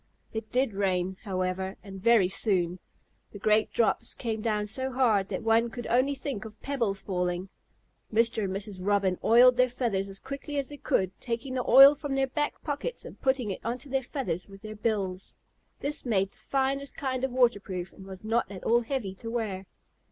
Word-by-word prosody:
It 220 -1 -5
did 255 -3 +1
rain, 190 -1 0
however, 190 0 -2
and 195 -2 -9
very 230 -3 +5
soon. 180 -3 0 0.5
The - - -7
great 215 +1 +2
drops 230 - +1
came 225 -3 -3
down 210 -2 0
so 260 +5 -3
hard 225 -7 +2
that - - -3
one 225 +1 +3
could 240 0 -7
only 260 +4 +2
think 270 -5 -4
of 220 -1 -11
pebbles 230 -9 -1
falling. 180 0 -2 0.6
Mr. 225 -1 +2
and 190 - -3
Mrs. 195 0 -4
Robin 195 -1 +1
oiled 245 +2 +7
their 255 0 +4
feathers 225 -6 -1
as 195 - -8
quickly 280 +5 -6
as 275 -2 -1
they 290 - -8
could, 190 -8 +1
taking 240 +2 -3
the 250 -2 -2
oil 275 +2 +10
from 290 -1 -4
their 270 0 +3
back 295 +3 -3
pockets 320 - -4
and - - -11
putting 260 -5 +1
it 185 - -4
onto 245 +4 -4
their 270 -1 +2
feathers 245 - -3
with 195 +1 -13
their 215 0 -7
bills. 200 -4 -2 0.5
This 290 +2 -3
made 195 -5 +1
the - - -17
finest 275 +1 -1
kind 260 -2 -2
of 265 - +1
waterproof 205 -8 0
and 195 - -12
was 190 0 -9
not 225 -1 0
at 190 - -8
all 235 +1 +4
heavy 235 -5 -3
to 225 +4 -8
wear. 210 -5 -3
225 Hz, 195 wpm, -28 LUFS, 195-260 Hz, 0.6 s, oil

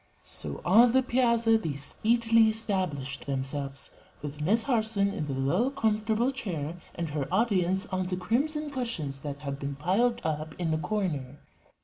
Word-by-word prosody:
So 70 -1 -3
on 230 +6 +6
the 260 0 +4
piazza 235 -3 +3
they 160 -9 -3
speedily 225 - +3
established 185 -12 -1
themselves, 135 0 -3 0.3
with 145 0 -6
Miss 215 +9 +3
Harson 220 -5 +2
in 150 - -3
the 135 - -2
low, 175 - +2
comfortable 220 -1 +1
chair 175 - -5
and 165 -3 -3
her 145 0 -3
audience 190 -2 +2
on 185 -3 -2
the 180 0 -2
crimson 290 +10 -1
cushions 230 - -2
that 145 0 -6
had 140 -1 -4
been 140 0 -4
piled 210 - +1
up 155 0 -3
in 165 -3 -1
a 155 - 0
corner. 150 -7 -2
185 Hz, 155 wpm, -28 LUFS, 145-230 Hz, 0.3 s, on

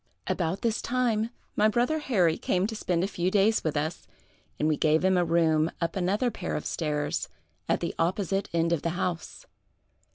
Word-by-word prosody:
"About 180 +2 -1
this 230 -1 0
time, 235 -3 0 0.3
my 210 - +4
brother 240 +8 +1
Harry 185 - +2
came 185 +1 0
to 220 +1 -3
spend 175 -4 0
a - - +1
few 180 -2 -1
days 210 +3 +3
with 155 -2 -1
us, 155 +4 -3 0.5
and 150 - +1
we 155 - +3
gave 155 +3 +2
him 190 0 +4
a 180 - +3
room 165 -2 +2
up 170 -1 -2
another 200 +6 +1
pair - - -4
of - - -4
stairs, 150 -3 -2 0.4
at - - +1
the - - -2
opposite 195 +3 0
end 170 0 +1
of 160 - 0
the 170 - -1
house. 180 - -3
180 Hz, 190 wpm, -27 LUFS, 165-215 Hz, 0.5 s, my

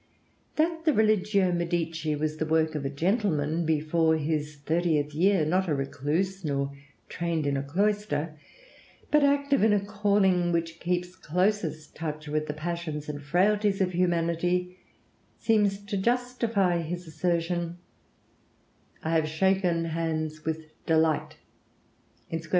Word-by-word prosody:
That 325 +1 0
the 310 - +4
'Religio 210 -4 +3
Medici' 165 -2 -1
was 155 +1 -2
the 155 - -1
work 160 0 +2
of 150 -2 -3
a 135 - -1
gentleman 165 - 0
before 160 +1 +2
his 150 -1 -2
thirtieth 150 0 0
year, 180 +1 +3
not 185 +4 +1
a 150 - +1
recluse 150 +8 -2
nor 140 -2 -1 0.3
trained 170 -3 -2
in 140 -1 +1
a 135 - 0
cloister, 175 0 -1 0.8
but 300 -1 +5
active 280 0 +3
in 215 0 +5
a 205 - +4
calling 200 -3 +2
which 165 -1 -2
keeps 180 +1 -2
closest 180 -2 -1
touch 155 -1 -5
with 155 +1 -1
the 150 - -2
passions 155 -2 -4
and 145 -1 -5
frailties 195 +6 +2
of 185 -2 +1
humanity, 175 +1 0 0.6
seems 205 -3 +2
to 205 -1 -2
justify 230 -5 +1
his 175 +2 -5
assertion, 170 +1 -1 1.3
"I 160 - -1
have 160 -1 +2
shaken 175 +1 +1
hands 155 -1 -2
with 160 0 -2 0.2
delight 160 -1 +2 1.0
[_sc. 165 0 -4
170 Hz, 135 wpm, -27 LUFS, 155-195 Hz, 1.3 s, but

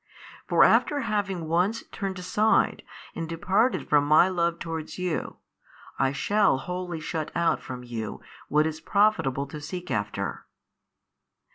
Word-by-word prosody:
For - - +5
after 290 -1 +4
having 200 -7 -2
once 180 +7 +1
turned 195 -2 -4
aside 210 +5 +2 0.3
and 165 -1 -5
departed 190 +9 +1
from 145 -1 +3
My 155 +5 +6
Love 170 -2 0
towards 165 -2 -5
you, 180 -3 -3 0.6
I 135 0 +3
shall 200 +4 +2
wholly 180 +3 -4
shut 155 0 -4
out 170 -1 +1
from 125 -1 -7
you 115 -3 -5 0.3
what 150 +2 +3
is 160 0 -3
profitable 200 -11 +2
to 150 +2 -9
seek 180 +4 -6
after. 100 -1 -3
170 Hz, 135 wpm, -26 LUFS, 150-190 Hz, 0.6 s, My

